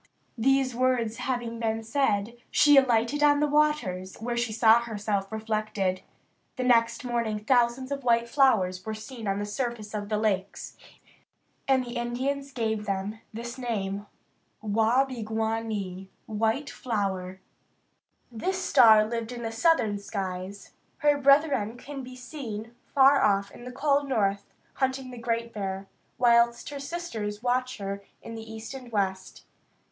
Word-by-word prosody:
These 270 Hz, +1 st, +3 dB
words 240 Hz, -3 st, +1 dB
having 240 Hz, -3 st, -3 dB
been 225 Hz, -1 st, -1 dB
said, 225 Hz, -3 st, 0 dB
she 290 Hz, -1 st, +5 dB
alighted 255 Hz, +1 st, +3 dB
on 290 Hz, -1 st, +5 dB
the 300 Hz, -, +3 dB
waters, 290 Hz, -12 st, +1 dB
where 240 Hz, +2 st, -4 dB
she 235 Hz, -1 st, -1 dB
saw 225 Hz, +1 st, +5 dB
herself 210 Hz, -3 st, -3 dB
reflected. 215 Hz, -4 st, -1 dB, 0.5 s
The 255 Hz, -, -2 dB
next 235 Hz, -1 st, +3 dB
morning 235 Hz, -3 st, -1 dB
thousands 245 Hz, +4 st, +1 dB
of 275 Hz, -1 st, -3 dB
white 235 Hz, -1 st, +3 dB
flowers 215 Hz, -9 st, +2 dB
were 220 Hz, 0 st, -4 dB
seen 225 Hz, 0 st, -8 dB
on 195 Hz, 0 st, 0 dB
the 205 Hz, -, -2 dB
surface 220 Hz, -1 st, -4 dB
of 205 Hz, -1 st, -4 dB
the 215 Hz, -, +1 dB
lakes, 200 Hz, -3 st, -2 dB, 0.9 s
and 260 Hz, -2 st, +3 dB
the 240 Hz, 0 st, -6 dB
Indians 265 Hz, +4 st, -2 dB
gave 220 Hz, -4 st, -2 dB
them 200 Hz, +2 st, -3 dB
this 235 Hz, +3 st, -7 dB
name, 205 Hz, -4 st, -3 dB, 0.5 s
wah 225 Hz, +5 st, +2 dB
be 255 Hz, -3 st, -7 dB
gwan 220 Hz, +1 st, -1 dB
nee 190 Hz, -3 st, -5 dB, 0.2 s
(white 225 Hz, +6 st, -1 dB
flower). 190 Hz, -5 st, -3 dB, 0.9 s
This 370 Hz, +12 st, -2 dB
star 225 Hz, -, +6 dB
lived 230 Hz, +1 st, -4 dB
in 240 Hz, -1 st, -6 dB
the 225 Hz, -, -3 dB
southern 225 Hz, -5 st, +2 dB
skies. 195 Hz, -1 st, -5 dB, 0.3 s
Her 295 Hz, -1 st, +3 dB
brethren 275 Hz, -5 st, +3 dB
can 275 Hz, +2 st, -7 dB
be 255 Hz, 0 st, -9 dB
seen 240 Hz, -4 st, -7 dB
far 275 Hz, 0 st, +5 dB
off 200 Hz, -1 st, +2 dB
in 240 Hz, -, -12 dB
the 250 Hz, -, -6 dB
cold 280 Hz, +1 st, +1 dB
north, 200 Hz, -5 st, 0 dB, 0.3 s
hunting 265 Hz, -1 st, -2 dB
the 245 Hz, -, -8 dB
Great 230 Hz, 0 st, -2 dB
Bear, 195 Hz, -1 st, -4 dB, 0.3 s
whilst 235 Hz, -1 st, +3 dB
her 285 Hz, -1 st, -6 dB
sisters 235 Hz, -10 st, -5 dB
watch 255 Hz, +1 st, 0 dB
her 200 Hz, -1 st, -5 dB, 0.2 s
in 230 Hz, -, -8 dB
the 225 Hz, 0 st, -8 dB
east 220 Hz, +3 st, -7 dB
and 255 Hz, -3 st, -9 dB
west. 190 Hz, -3 st, -2 dB
230 Hz, 150 wpm, -27 LUFS, 210-255 Hz, 0.9 s, star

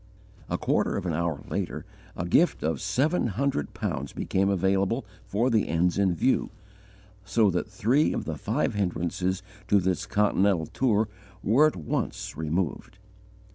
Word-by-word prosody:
A -, -, 0 dB
quarter -, -, +1 dB
of -, -, -4 dB
an 85 Hz, -, -1 dB
hour 80 Hz, -2 st, -1 dB
later, -, -, -3 dB, 0.3 s
a 90 Hz, -, -2 dB
gift 160 Hz, -, +3 dB
of 80 Hz, +1 st, -1 dB
seven 130 Hz, -, +1 dB
hundred 120 Hz, -, -1 dB
pounds 70 Hz, +2 st, -3 dB
became 95 Hz, +1 st, 0 dB
available 100 Hz, +5 st, +1 dB, 0.2 s
for 115 Hz, +6 st, +1 dB
the 110 Hz, -2 st, +2 dB
ends 85 Hz, +3 st, +1 dB
in 95 Hz, -3 st, +2 dB
view, 130 Hz, -, +1 dB, 0.7 s
so 100 Hz, +1 st, +3 dB
that 90 Hz, +4 st, -2 dB
three 120 Hz, +10 st, +2 dB
of -, -, -3 dB
the -, -, -3 dB
five -, -, -1 dB
hindrances 90 Hz, -1 st, -1 dB, 0.2 s
to 100 Hz, -, +4 dB
this 95 Hz, -1 st, -1 dB
Continental 100 Hz, -4 st, +2 dB
tour 110 Hz, -, +1 dB, 0.4 s
were 135 Hz, +9 st, +5 dB
at 155 Hz, -, -2 dB
once 80 Hz, -4 st, -3 dB
removed. 80 Hz, +4 st, -2 dB
95 Hz, 150 wpm, -27 LUFS, 85-110 Hz, 0.7 s, were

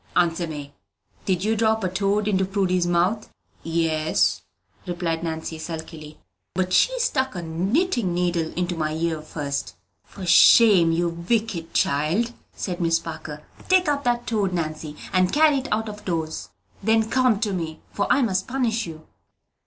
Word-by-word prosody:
"Answer 170 Hz, 0 st, +2 dB
me; 145 Hz, -2 st, -7 dB, 0.5 s
did 185 Hz, -2 st, 0 dB
you 220 Hz, +2 st, +1 dB
drop 220 Hz, 0 st, +1 dB
a -, -, +2 dB
toad 200 Hz, +3 st, 0 dB
into 190 Hz, -2 st, +2 dB
Prudy's 185 Hz, -2 st, 0 dB
mouth?" 180 Hz, +5 st, +1 dB, 0.3 s
"Yes," 155 Hz, -, +1 dB, 0.5 s
replied 170 Hz, -2 st, -2 dB
Nancy, 160 Hz, -1 st, -4 dB
sulkily; 160 Hz, -2 st, -8 dB, 0.4 s
"but 185 Hz, 0 st, -1 dB
she -, -, +3 dB
stuck 265 Hz, -, 0 dB
a 175 Hz, -, -4 dB
knitting 195 Hz, -, 0 dB
needle 175 Hz, -2 st, 0 dB
into 180 Hz, 0 st, -1 dB
my 155 Hz, -1 st, -2 dB
ear 160 Hz, -1 st, -1 dB
fust!" 145 Hz, -2 st, -4 dB, 0.3 s
"For 190 Hz, -, -9 dB
shame, 185 Hz, -1 st, +7 dB
you 170 Hz, +1 st, +1 dB
wicked 170 Hz, 0 st, -2 dB
child," 165 Hz, +12 st, +1 dB, 0.2 s
said 180 Hz, -2 st, -4 dB
Miss 165 Hz, -1 st, +3 dB
Parker. 155 Hz, -2 st, -8 dB, 0.3 s
"Take 370 Hz, -2 st, +4 dB
up 285 Hz, -1 st, 0 dB
that 240 Hz, 0 st, +1 dB
toad, 205 Hz, -5 st, 0 dB
Nancy, 155 Hz, -2 st, -4 dB, 0.2 s
and 185 Hz, -1 st, +3 dB
carry 300 Hz, -1 st, +4 dB
it 265 Hz, -, -6 dB
out 220 Hz, +1 st, 0 dB
of 210 Hz, -1 st, -8 dB
doors; 160 Hz, -3 st, -3 dB, 0.3 s
then 220 Hz, +2 st, +2 dB
come 250 Hz, -3 st, +2 dB
to 210 Hz, -4 st, 0 dB
me, 160 Hz, -3 st, -4 dB
for 200 Hz, -, -1 dB
I 270 Hz, -, +4 dB
must 190 Hz, -4 st, 0 dB
punish 235 Hz, -5 st, -1 dB
you." 160 Hz, -1 st, -10 dB
180 Hz, 160 wpm, -23 LUFS, 165-220 Hz, 0.5 s, shame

